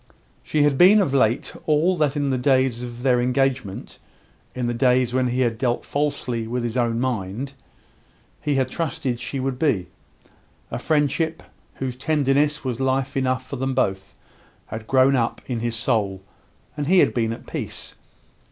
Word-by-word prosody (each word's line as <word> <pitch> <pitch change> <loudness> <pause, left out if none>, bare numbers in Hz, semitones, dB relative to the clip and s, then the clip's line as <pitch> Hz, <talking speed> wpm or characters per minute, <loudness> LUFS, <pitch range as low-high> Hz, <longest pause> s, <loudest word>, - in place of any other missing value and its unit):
She 150 -1 +1
had 145 -2 +2
been 195 +4 +8
of 170 -9 +1
late 120 -3 +2
all 160 +4 +3
that 150 -2 +1
in 145 -2 0
the 130 - +1
days 130 -2 +2
of 120 0 -7
their 125 -2 +3
engagement 130 -5 -1 0.6
in 125 -1 -2
the 120 - 0
days 125 0 +2
when 130 0 +2
he 125 +1 0
had 115 -3 0
dealt 120 -2 0
falsely 140 -6 -2
with 120 +1 -2
his 120 0 -3
own 120 -2 +1
mind 125 +1 -3 0.9
he 145 -2 0
had 130 -1 0
trusted 135 -6 -2
she 130 +3 -4
would 130 -1 -2
be. 105 - +1 0.8
A - - -3
friendship, 155 +1 0 0.3
whose 130 -2 -4
tenderness 145 +1 +1
was 125 -3 -3
life 135 +1 0
enough 130 -1 0
for 140 - -5
them 135 +1 -2
both, 95 -7 -1 0.5
had 110 0 -7
grown 135 +1 +4
up 120 -2 0
in 120 -3 -3
his 115 0 -2
soul, 105 -5 -1 0.5
and 145 -1 -3
he 185 +3 +4
had - - +5
been 115 -2 0
at 115 - -7
peace. - - -5
130 Hz, 170 wpm, -23 LUFS, 120-140 Hz, 0.9 s, been